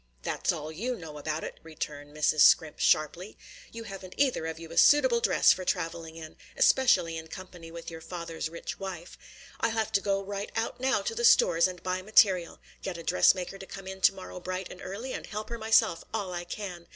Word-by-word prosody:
"That's - - 0
all 155 +1 -5
you 235 +10 -3
know 160 -6 -9
about 155 +1 -3
it!" - - -7
returned 150 -2 -7
Mrs. 155 0 +2
Scrimp 155 +1 +5
sharply. 170 +7 +1 0.3
"You 230 0 -7
haven't 195 -3 -9
either 260 - +1
of 160 0 -5
you 165 0 -10
a 165 - -8
suitable 260 -5 +5
dress - - +4
for 185 - -6
travelling 165 -2 -3
in, 160 -1 -10 0.2
especially 175 -11 +4
in 160 - -10
company 175 -1 -10
with 170 0 -8
your 165 0 -9
father's 165 -2 -5
rich 170 +1 -7
wife. 185 -3 -7 0.4
I'll 230 - +1
have 220 -1 -1
to 200 - +2
go 195 -1 0
right 200 +1 -5
out 230 +2 -2
now 265 +1 +1
to 465 - -2
the 475 +1 -3
stores 175 - +5
and 180 -2 -9
buy 185 0 -2
material, 190 -3 +3 0.2
get 185 -3 -4
a 170 - -8
dress 90 - +4
maker 185 +1 -6
to 195 - -8
come 195 -1 -9
in 190 0 -8
to - - +5
morrow 185 -1 -8
bright 185 +1 -5
and 180 - -11
early, 225 +8 -6
and - - -6
help 215 0 -6
her 235 0 -5
myself 220 -6 +3
all 200 -5 -3
I 175 0 -4
can. 175 -2 -7
185 Hz, 215 wpm, -28 LUFS, 165-210 Hz, 0.4 s, Scrimp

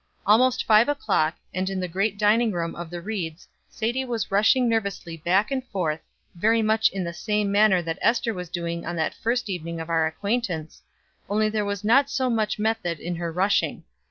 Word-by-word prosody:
Almost 240 +5 +4
five 220 +4 +5
o'clock, 170 - +1 0.2
and 185 +1 -1
in 190 -1 -3
the 180 - -2
great 195 +4 -1
dining 220 +2 +3
room 170 -3 -3
of 170 -1 -7
the 175 0 -6
Rieds 180 -6 -5 0.2
Sadie 240 +4 -2
was 235 -6 -3
rushing 220 +5 +4
nervously 200 -7 -2
back 185 - +1
and 265 -1 -1
forth, 160 -7 -2 0.3
very 220 +5 +2
much 220 +1 +3
in 195 -1 -4
the 170 0 -4
same 210 +2 -1
manner 200 -3 +4
that 165 -1 -4
Ester 230 -1 +2
was 180 -3 -6
doing 170 -1 -4
on 170 - -4
that 160 -1 -1
first 240 +1 -1
evening 170 -3 -4
of 165 +1 -5
our 160 -1 +3
acquaintance, 180 -3 -3 0.5
only 215 +1 +2
there 210 -1 -1
was 200 -1 -3
not 270 +6 +4
so 260 -3 0
much 220 -2 0
method 215 -6 -1
in 175 0 -4
her 170 -1 -3
rushing. 190 +4 +1
200 Hz, 195 wpm, -25 LUFS, 170-220 Hz, 0.5 s, five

